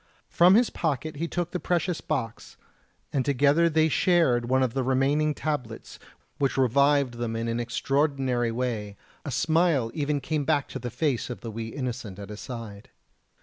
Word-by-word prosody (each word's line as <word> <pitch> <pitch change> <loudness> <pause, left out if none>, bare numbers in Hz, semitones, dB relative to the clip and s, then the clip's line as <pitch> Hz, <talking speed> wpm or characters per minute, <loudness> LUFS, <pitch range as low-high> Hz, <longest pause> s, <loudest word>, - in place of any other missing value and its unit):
From 180 +3 +6
his 235 +1 +3
pocket 155 -1 -2
he 165 +3 -2
took 175 0 -3
the 180 - -2
precious 175 -1 -1
box, 125 -7 -4 0.6
and 135 - +1
together 145 +5 +3
they 160 0 +3
shared 155 -8 +2
one 130 0 +3
of 125 -3 -1
the 135 - 0
remaining 140 +4 +1
tablets 125 -9 -4 0.4
which 140 -1 0
revived 135 -1 +3
them 115 -1 -2
in 115 +1 -2
an 115 +1 -1
extraordinary 130 -1 0
way; 115 -4 -3 0.3
a - - -5
smile 160 -7 +2
even 145 -1 -1
came 150 +2 -2
back 145 -1 +1
to 135 - -6
the 120 0 -5
face 130 +1 -1
of 125 - -6
the 115 - -6
wee 110 +1 -5
innocent 120 -5 -5
at 100 -1 -9
his 105 0 -8
side. 115 -5 -8
135 Hz, 175 wpm, -26 LUFS, 120-155 Hz, 0.6 s, From